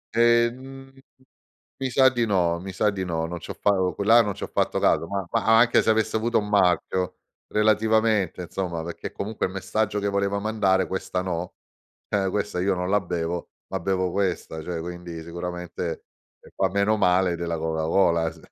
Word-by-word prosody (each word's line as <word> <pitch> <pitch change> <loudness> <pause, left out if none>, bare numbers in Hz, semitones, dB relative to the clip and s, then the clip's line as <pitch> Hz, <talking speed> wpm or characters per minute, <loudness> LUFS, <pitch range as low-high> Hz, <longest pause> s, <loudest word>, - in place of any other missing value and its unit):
Ehm, 120 +3 +1 0.9
mi 135 -1 -3
sa 130 +1 +5
di 120 -2 0
no, 90 -5 +1
mi 95 +2 -7
sa 100 +3 +1
di 100 -2 -2
no, 80 -2 -2
non 85 +1 -5
c'ho - - -7
fa 105 - +3
o 90 -1 0
co - - -4
là 115 +3 +7
non 105 -2 -2
c'ho - - -6
fatto - - 0
caso, 85 - +2
ma 100 0 -3
ma - - 0
a 110 0 +5
anche 120 +1 +5
se - - +2
avesse 110 0 +1
avuto 115 +2 +1
un 105 -1 -3
marchio 90 -2 +1 0.3
relativamente 110 -2 +2
insomma, 90 -1 -4
perché 85 - -6
comunque 105 +2 -4
il 95 - -7
messaggio 100 +2 -1
che 100 0 -1
voleva 100 0 0
mandare: 100 -3 +1
"Questa 95 -1 -3
no, 90 -1 -4 0.5
ehm, 100 -2 +1
questa 100 -2 -2
io 95 +1 +1
non 90 0 -3
la 105 +1 +3
bevo, 85 -1 -3 0.2
ma - - -3
bevo 95 0 0
questa." 90 -5 -2
Cioè 85 +1 -4
quindi 85 -1 -7
sicuramente, 90 0 -5 0.4
ehm, - - -17
fa 95 - +1
meno 100 +3 +1
male 90 -1 +3
della 85 -1 -3
Coca-Cola 80 +1 +1
s 80 - -15
95 Hz, 190 wpm, -25 LUFS, 85-110 Hz, 0.9 s, là